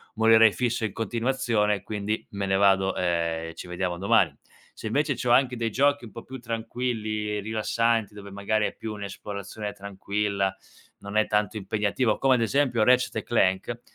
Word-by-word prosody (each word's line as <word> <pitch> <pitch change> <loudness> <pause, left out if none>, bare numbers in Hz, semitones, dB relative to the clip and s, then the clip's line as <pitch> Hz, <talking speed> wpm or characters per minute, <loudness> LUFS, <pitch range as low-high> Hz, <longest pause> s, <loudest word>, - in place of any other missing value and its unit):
morirei 110 -1 +6
fisso 120 -2 -1
in 105 - -4
continuazione, 115 -2 0
quindi 105 +1 -3
me 100 -1 -3
ne 95 0 +1
vado, 95 -1 +3
ehm, 85 -2 -1
e - - -9
ci - - -8
vediamo 90 0 -2
domani." 95 +3 +3 0.4
Se - - -7
invece 145 +5 +1
c'ho 125 - -1
anche 125 0 +4
dei 115 -1 -1
giochi 140 +3 +2
un 110 - -11
po' - - -9
più 130 0 -9
tranquilli, 110 -2 -3
rilassanti, 110 0 0
dove 100 -1 -10
magari 105 +2 0
è - - -7
più 110 -1 -6
un'esplorazione 100 +1 -6
tranquilla, 100 0 -2 0.4
non 100 +1 -5
è 110 - +3
tanto 105 0 0
impegnativo, 105 +3 0
come 135 -1 +4
ad 120 - 0
esempio 120 -1 +2
Ratchet& 125 +1 +3
Clank 110 +2 +1
105 Hz, 170 wpm, -26 LUFS, 100-115 Hz, 0.4 s, morirei